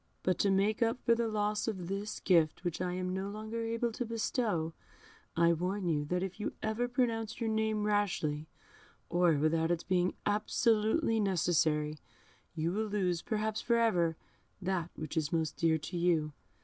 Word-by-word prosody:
But 185 - +1
to 200 - +3
make 200 +3 +2
up 230 +1 +2
for 235 - +5
the 230 0 0
loss 210 0 0
of 190 -6 -3
this 200 +3 -3
gift, 165 -3 +3
which 175 -1 -2
I 180 -1 -1
am 185 0 -2
no 190 +1 -2
longer 215 +2 -5
able 230 +1 -1
to 235 - -3
bestow, 220 -7 -1 0.6
I 170 0 +5
warn 180 +3 -2
you 150 -3 +1
that 180 +4 -1
if 190 +1 -5
you 210 - -3
ever 220 +3 0
pronounce 230 -3 -1
your 225 -2 0
name 220 -1 0
rashly, 180 -8 0 0.6
or 175 -1 +4
without 160 +2 +2
its 170 -1 0
being 180 -1 +1
absolutely 220 +3 +2
necessary, 155 -6 +1 0.6
you 165 +1 0
will 215 +3 -1
lose, 185 -5 0
perhaps 215 0 -1
for 235 - +2
ever, 175 -8 +2 0.4
that 180 -3 -1
which 155 -2 -6
is 155 -2 0
most 160 -2 0
dear 165 -1 +3
to 155 +4 -7
you. 165 -3 +1
190 Hz, 175 wpm, -32 LUFS, 170-220 Hz, 0.6 s, for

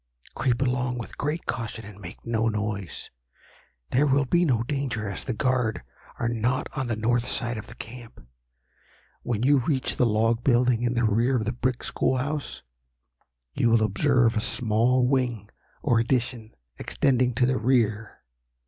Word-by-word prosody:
Creep 125 0 0
along 125 -1 -1
with 115 - -7
great 150 +4 -3
caution, 115 -1 -4
and 105 -1 -12
make 90 -2 -10
no 115 -1 +1
noise. 105 -3 -4 0.8
There 145 +4 +3
will 140 0 +3
be 175 +7 +2
no 120 -7 +2
danger, 130 -5 -2
as 100 - -4
the 130 - -3
guard 125 - 0 0.3
are 120 - -1
not 120 +2 0
on 130 -4 -2
the 115 - -1
north 120 +2 0
side 120 0 -1
of 105 0 -7
the - - -12
camp. 115 - -11 1.0
When 115 -2 -2
you 140 +1 +5
reach 130 +1 -1
the 125 - +3
log 115 +2 +1
building 125 -2 +3
in 120 0 0
the 120 0 +2
rear 115 +5 +2
of 110 -3 0
the 115 - -1
brick 125 +1 -2
school 130 - 0
house, 145 +3 -3 0.9
you 115 - +2
will 115 -1 +4
observe 115 +3 +2
a 110 - +1
small 120 +3 +3
wing, 125 -6 -1 0.3
or 115 - +3
addition, 120 -2 -1 0.2
extending 125 -3 +1
to 125 - +3
the 130 0 +1
rear. 115 -3 0
120 Hz, 165 wpm, -26 LUFS, 110-130 Hz, 1.0 s, you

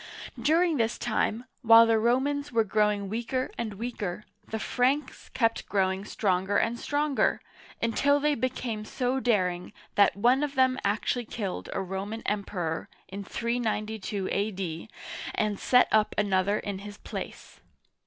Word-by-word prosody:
During 330 0 +3
this 230 -1 0
time, 235 0 -1 0.2
while 230 -2 +8
the 225 -1 +3
Romans 280 +5 +1
were 230 -2 +3
growing 210 -1 +1
weaker 240 +5 -2
and 220 -3 -4
weaker, 210 -4 -4 0.2
the 220 - -3
Franks 260 +5 -1
kept 230 -2 0
growing 190 0 +1
stronger 190 -1 0
and 235 +1 0
stronger, 290 -1 +1 0.4
until 285 +5 +3
they 300 +1 +2
became 245 -4 -2
so 250 +4 -1
daring 185 -7 0 0.2
that 200 - +4
one 245 +6 +4
of 290 -1 -2
them 260 0 +3
actually 220 +4 0
killed 205 -4 -4
a 195 - -2
Roman 195 +4 -5
Emperor 185 -6 -2 0.2
in 200 +2 -6
392 220 -3 -2
a.d. 195 -3 -2 0.5
and 210 -2 0
set 250 0 +5
up 215 -1 +3
another 200 0 +2
in 200 -2 -4
his 205 +1 -9
place. - - -8
220 Hz, 140 wpm, -28 LUFS, 200-250 Hz, 0.5 s, while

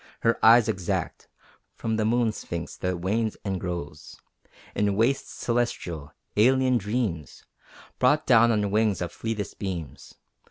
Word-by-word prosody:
Her 115 - +1
eyes 115 0 +7
exact 95 -5 -3 0.5
From 110 -1 -2
the 110 - +1
Moon 115 0 +2
Sphinx 85 -5 -6
that 90 -1 -2
wanes 110 +4 -1
and 95 -2 -2
grows 85 -4 -6 0.5
In 100 -1 +1
wastes 120 +6 +1
celestial, 90 -11 -2 0.2
alien 130 +3 +4
dreams 105 - -3 0.5
Brought 145 +4 +3
down 120 -2 +5
on 105 -3 0
wings 105 -3 +1
of 85 - -5
fleetest 110 -3 -5
beams. 85 -9 -6
105 Hz, 130 wpm, -26 LUFS, 90-115 Hz, 0.5 s, eyes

